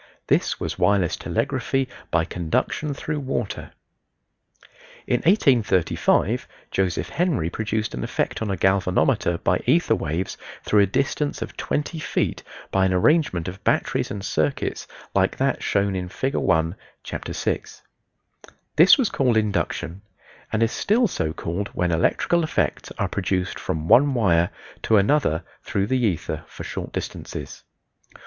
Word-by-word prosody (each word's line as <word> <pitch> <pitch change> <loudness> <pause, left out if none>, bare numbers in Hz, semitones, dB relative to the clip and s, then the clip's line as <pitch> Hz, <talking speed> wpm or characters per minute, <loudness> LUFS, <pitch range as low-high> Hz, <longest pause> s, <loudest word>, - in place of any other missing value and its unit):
This - - +1
was - - -4
wireless 100 -4 +3
telegraphy 135 -1 -1 0.2
by 80 -1 +2
conduction 90 - -1
through 150 +1 -3
water. 130 -6 -3 1.4
In 125 - +2
1835 120 - +2 0.2
Joseph 95 -2 0
Henry 160 - 0
produced 110 0 -2
an 60 - -4
effect - - -2
on 110 - -1
a 95 - -1
galvanometer 90 -2 +2
by 90 +1 +1
ether 165 +7 +4
waves 80 +4 -2 0.2
through 105 - +3
a 100 - +4
distance 140 +7 -1
of - - -9
twenty 150 +2 -2
feet - - -1 0.3
by 95 0 +3
an 95 - 0
arrangement 130 - +2
of 95 +2 -7
batteries - - +1
and 100 -1 -5
circuits 75 -6 -1 0.3
like - - +2
that - - 0
shown 100 -1 +1
in 90 -1 -3
Fig. 135 +8 -2
1, 80 +2 +1 0.3
Chapter - - -5
VI. - - -1 1.2
This 170 - +8
was 260 -6 +1
called 125 -4 +2
induction, 95 -3 -1 0.5
and 110 +1 +2
is 115 - +1
still 235 +3 +2
so 80 - -2
called 85 +5 -3
when 90 -1 +1
electrical 165 - +2
effects 155 - -1
are - - 0
produced 95 -2 -2
from 80 0 -3
one 140 +6 +5
wire 85 -7 +3 0.3
to 110 - +3
another 100 - +2 0.2
through 100 -1 -1
the 125 +3 0
ether 95 -8 -1
for - - -9
short - - -5
distances. - - -6
100 Hz, 140 wpm, -23 LUFS, 90-135 Hz, 1.4 s, This